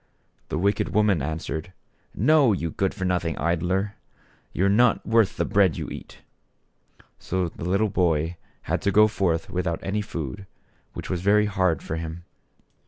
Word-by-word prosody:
The - - -2
wicked 100 +5 0
woman 105 -7 +3
answered: 80 +4 -4 0.4
"No, 135 0 +4
you 85 -4 -2
good 95 +3 0
for 95 -3 -3
nothing 90 -3 -1
idler! 90 +4 0 0.6
you 95 - 0
are - - +4
not 110 +4 +3
worth 115 -3 +2
the - - +1
bread 95 -7 +3
you - - -5
eat." - - -10 1.0
So 90 -1 -2
the 80 - -8
little 100 +3 +2
boy 85 -3 0 0.3
had - - -1
to 100 - +1
go 105 +2 +6
forth 85 -6 -1
without 90 -2 -1
any 105 +2 -1
food, 85 -1 -6 0.5
which - - -6
was 90 - -1
very 105 +2 +4
hard 95 -6 0
for 80 - -4
him. 80 +1 -6
95 Hz, 165 wpm, -25 LUFS, 85-105 Hz, 1.0 s, go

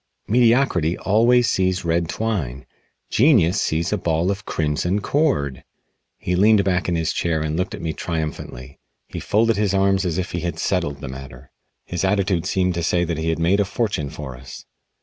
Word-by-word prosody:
Mediocrity 115 - +3
always 120 +4 +3
sees 95 -1 0
red 85 0 0
twine; 85 - -3 0.5
genius 105 - +4
sees 80 +5 0
a 105 - 0
ball 85 +2 0
of 100 -1 -6
Crimson 80 +5 0
Cord!" 105 - 0 0.5
He 90 - -2
leaned 105 +2 +5
back 90 -2 0
in 85 - 0
his 80 0 -1
chair 85 -2 0
and 75 0 -2
looked 90 +2 -2
at - - -10
me 80 -1 -2
triumphantly. 75 -6 -5 0.3
He - - -6
folded 115 +1 +1
his 100 -2 +1
arms 95 0 +2
as 85 -3 -2
if 95 -1 -3
he 85 - -2
had 85 -2 -4
settled 80 -6 -1
the - - -6
matter. 65 -1 -10 0.3
His 90 - -3
attitude 95 -3 +1
seemed 90 -1 +1
to 85 - -2
say 85 +1 +1
that 85 -2 -2
he 80 +1 -1
had 80 - 0
made 85 +5 +2
a - - +4
fortune 100 -7 -2
for 70 -3 -7
us. 65 +1 -11
90 Hz, 190 wpm, -21 LUFS, 80-100 Hz, 0.5 s, leaned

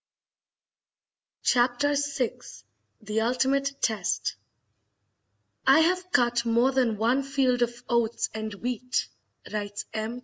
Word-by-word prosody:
Chapter 250 +4 +2
VI 280 -3 -1 0.6
The 215 +1 -1
Ultimate 270 +4 +1
Test 220 -3 0 1.3
"I 275 +4 +7
have 365 +2 +1
cut 240 -3 +2
more 235 +3 +3
than 250 -5 +1
one 235 +5 +2
field 270 -3 +1
of 240 0 -1
oats 235 -1 +1
and 220 0 -4
wheat," 250 +3 -2 0.5
writes 205 -1 -4
M. 220 +3 -3
245 Hz, 105 wpm, -27 LUFS, 230-270 Hz, 1.3 s, I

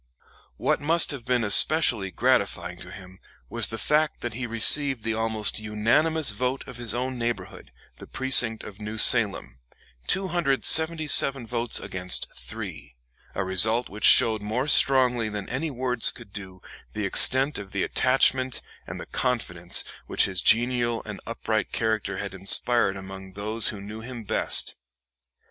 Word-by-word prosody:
What - - -1
must 165 +3 +3
have 130 -5 -8
been 125 -2 0
especially 110 -1 +2
gratifying - - -2
to - - -8
him 95 0 -14 0.3
was - - +1
the 115 - -7
fact 150 +6 -1
that 120 -2 -5
he 125 +2 -6
received 125 +2 +3
the 115 - -2
almost 110 -1 -2
unanimous 115 +10 0
vote 130 +1 -4
of 130 -3 -10
his 120 -2 -5
own 130 0 -4
neighborhood, 110 -5 -6 0.3
the - - -13
precinct 125 -4 +2
of 105 +1 -12
New 105 +1 -7
Salem, 105 - +2 0.5
277 160 -5 +3
votes 120 0 -1
against 90 0 -2
3, - - -9 0.4
a 95 - -2
result 110 +6 +1
which 105 +2 -4
showed 110 -2 +5
more 115 +7 -3
strongly 125 -5 +3
than 105 -2 -7
any 155 +5 -4
words 125 -3 +2
could 120 -6 -10
do 95 -3 -10 0.3
the 105 -1 -4
extent 130 +8 +3
of 100 -1 -10
the 95 -1 -3
attachment 130 0 +1 0.2
and - - -8
the - - -8
confidence 90 -9 -3 0.2
which - - +1
his 95 -2 +1
genial 120 +1 +1
and - - -8
upright - - -3
character 110 -3 -3
had 100 -1 -6
inspired 100 +2 +2
among 95 0 -11
those 105 +3 -2
who 105 - -4
knew 105 +3 -10
him 120 0 -9
best. - - -1
115 Hz, 150 wpm, -24 LUFS, 105-130 Hz, 0.5 s, showed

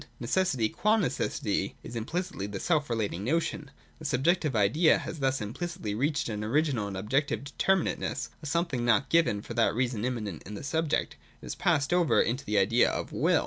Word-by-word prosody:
Necessity 130 -2 +1
qua 215 - +2
necessity 200 - -1
is 120 - -8
implicitly 155 - -3
the 100 -1 -5
self 150 - +1
relating 105 -5 -2
notion. 150 +2 -1 0.3
The 155 - -10
sub 135 -3 0
jective 165 -5 +2
idea 110 - +4
has 160 - -6
thus 135 -2 +1
implicitly 115 - -4
reached 145 +6 0
an 105 -2 -3
original 130 -2 +1
and 100 -1 -5
objective 135 +9 0
determinateness, 185 +6 0
— - - -34
a 155 - -6
something 170 -5 0
not 120 +3 +3
given, 165 -10 +3
and 100 - -9
for - - -6
that 115 -2 +2
reason 120 -3 -1
immanent 110 -9 -3
in 105 - -7
the - - -7
subject. 160 +2 -1 0.3
It - - -8
has - - -4
passed 145 +4 +1
over 175 -3 +3
into 125 +5 +1
the 105 0 0
idea 110 +5 +4
of - - -4
Will. - - +3
130 Hz, 195 wpm, -29 LUFS, 110-160 Hz, 0.3 s, idea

